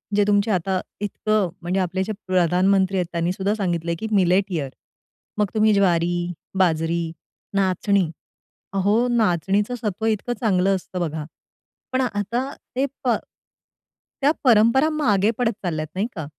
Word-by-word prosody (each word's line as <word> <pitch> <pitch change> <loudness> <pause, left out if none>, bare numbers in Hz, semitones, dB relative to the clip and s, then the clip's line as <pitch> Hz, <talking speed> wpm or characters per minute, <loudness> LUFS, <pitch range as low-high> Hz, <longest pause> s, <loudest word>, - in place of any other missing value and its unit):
जे 205 - +4
तुमचे 205 +1 +3
आता 185 0 0 0.2
इतकं 210 -1 0
म्हणजे 180 +3 -1
आपले 185 +1 0
जे 210 - -4 0.2
प्रधानमंत्री 185 +2 +2
आहेत 180 - +1
त्यांनी 170 0 0
सुद्धा 195 +2 -1
सांगितलंय 170 -5 -1
की, 220 - -3
"मिलेट 190 0 +3
इयर" 150 -6 -2 0.7
मग 210 -1 +2
तुम्ही 215 0 +4
ज्वारी, 175 -3 +2 0.4
बाजरी, 165 -1 +2 0.5
नाचणी. 190 -1 +2 0.6
अहो! 205 +5 +2
नाचणीचं 205 -1 +1
सत्व 215 0 -2
इतकं 225 +2 0
चांगलं 195 -4 +2
असतं 185 0 -5
बघा. 155 -2 -3 0.7
पण 260 0 +1
आता 235 +2 -1 0.3
ते 265 +2 +2 0.2
प 245 -3 +3 1.1
त्या 280 +2 +5
परंपरा 240 +4 +5
मागे 220 -10 +2
पडत 245 -2 +2
चालल्यात 155 -4 -2
नाही 200 +4 0
का? 160 -5 -4
195 Hz, 140 wpm, -23 LUFS, 180-215 Hz, 1.1 s, त्या